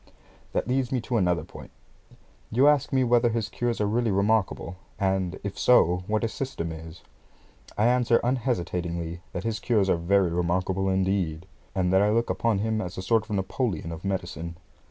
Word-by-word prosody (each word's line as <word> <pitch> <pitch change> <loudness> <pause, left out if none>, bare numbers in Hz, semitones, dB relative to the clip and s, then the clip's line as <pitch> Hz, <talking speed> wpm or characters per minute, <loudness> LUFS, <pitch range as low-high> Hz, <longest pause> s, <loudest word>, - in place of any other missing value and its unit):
That - - -1
leads 130 -1 0
me 130 - +1
to 120 +1 -1
another 90 -5 +1
point. - - -11 0.8
You 130 +5 +4
ask 145 -2 +3
me 130 -1 +3
whether 120 -1 +3
his 110 -2 -2
cures 120 0 -2
are 105 - +2
really 115 +3 +1
remarkable, 100 -3 0 0.2
and, 95 -2 0
if 100 -1 -5
so, 90 -7 +4
what 110 +1 0
his 115 - -1
system 130 - -4
is. 80 +1 -10 0.7
I 105 - +3
answer 120 -1 +3
unhesitatingly, 90 -9 -2
that 90 - -5
his 115 -2 -2
cures 105 -6 +2
are - - +3
very 90 +1 +2
remarkable, 90 +2 0
indeed, 95 -3 0 0.3
and 90 -1 +1
that 95 - +5
I 105 - +3
look 115 +2 +1
upon 115 -3 +1
him 110 +2 0
as 90 0 -6
a 95 - -4
sort 110 +1 +2
of 105 - -1
Napoleon 95 - -2
of 80 0 -8
medicine. 85 -3 -4
100 Hz, 180 wpm, -26 LUFS, 90-115 Hz, 0.8 s, that